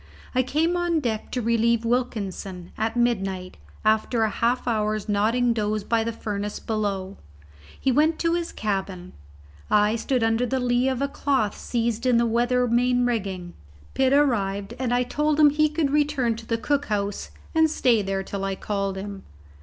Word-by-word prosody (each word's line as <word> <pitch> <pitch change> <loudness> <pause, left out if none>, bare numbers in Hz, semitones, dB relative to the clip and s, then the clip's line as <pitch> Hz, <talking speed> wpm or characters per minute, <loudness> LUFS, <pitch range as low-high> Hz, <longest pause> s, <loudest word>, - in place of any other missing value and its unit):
I 255 - +3
came 310 +7 0
on 345 -2 +1
deck 230 -6 -3
to 250 - -2
relieve 230 0 +2
Wilkinson, 200 -7 -2
at 225 +2 -2
midnight, 195 -6 -1 0.3
after 220 +2 +2
a 220 - +1
half 240 +2 0
hour's 215 -2 0
nodding 230 +4 +2
doze 215 -1 -1
by 225 +1 +1
the 230 - -2
furnace 210 -2 -4
below. 200 -3 -3 0.6
He 265 - +1
went 310 +5 +3
to 335 0 +1
his 345 -1 -2
cabin; 190 -3 -3 0.6
I 210 +1 +3
stood 245 +1 0
under 225 +2 +1
the 265 +2 0
lee 245 +1 +2
of 260 +1 -1
a - - +1
cloth 270 -7 0
seized 235 0 -2
in 245 -2 +4
the 235 - +3
weather 245 +2 +2
main 245 +1 +2
rigging. 190 -7 -2 0.4
Pitt 265 -1 +2
arrived, 205 -7 +1
and 255 -2 -1
I 245 0 +2
told 300 +4 0
him 295 -1 +7
he 305 +1 +3
could 300 -2 0
return 290 -5 +1
to 230 0 -11
the 230 - 0
cook 285 +4 0
house 205 -1 -2 0.2
and 320 -1 +4
stay 245 -7 +2
there 195 -1 -2
till 195 0 -5
I 195 0 -1
called 195 -1 -2
him. 200 0 -6
230 Hz, 175 wpm, -24 LUFS, 205-255 Hz, 0.6 s, him